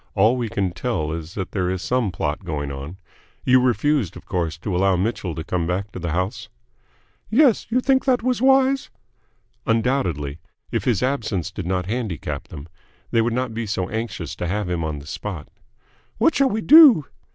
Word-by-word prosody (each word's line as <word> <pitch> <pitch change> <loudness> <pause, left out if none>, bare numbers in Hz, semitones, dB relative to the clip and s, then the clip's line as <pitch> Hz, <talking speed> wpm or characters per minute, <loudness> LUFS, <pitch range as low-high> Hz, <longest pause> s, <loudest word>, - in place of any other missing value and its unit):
All 110 +4 +4
we 120 -3 -2
can 95 -1 -1
tell 85 -6 -2
is 80 +1 -6
that 95 -3 -4
there 90 -3 -1
is 95 0 -2
some 125 -4 0
plot 80 +1 -3
going 75 -5 -3
on. 70 +6 -7 0.5
You 130 0 +5
refused, 130 - +1
of - - -13
course, 85 -4 -2
to 90 +3 -3
allow 95 +1 +3
Mitchell 90 -3 -2
to 80 - -4
come 85 -1 -2
back 95 +3 -2
to - - -7
the 85 -1 -3
house?" 90 +4 -2 0.8
"Yes. 245 +1 +4
You 250 +3 +2
think 265 0 +2
that 255 -4 +2
was 250 -1 0
wise?" 270 0 +3 0.8
"Undoubtedly. 95 - 0 0.3
If - - -1
his 120 -4 +1
absence 110 - -1
did 95 -4 -6
not 90 -1 -1
handicap 110 -5 -4
them, 75 0 -9 0.4
they 115 - +3
would 120 +1 0
not 125 -1 -2
be 115 0 -3
so 95 -2 -2
anxious 115 +1 -4
to 90 - -3
have 105 +2 -2
him 85 -2 -2
on 80 -2 -3
the 70 - -10
spot." 80 +1 -6 0.7
"What 260 +9 +3
shall 275 -1 +3
we 220 -1 -1
do?" 285 - +8
100 Hz, 190 wpm, -22 LUFS, 85-130 Hz, 0.8 s, do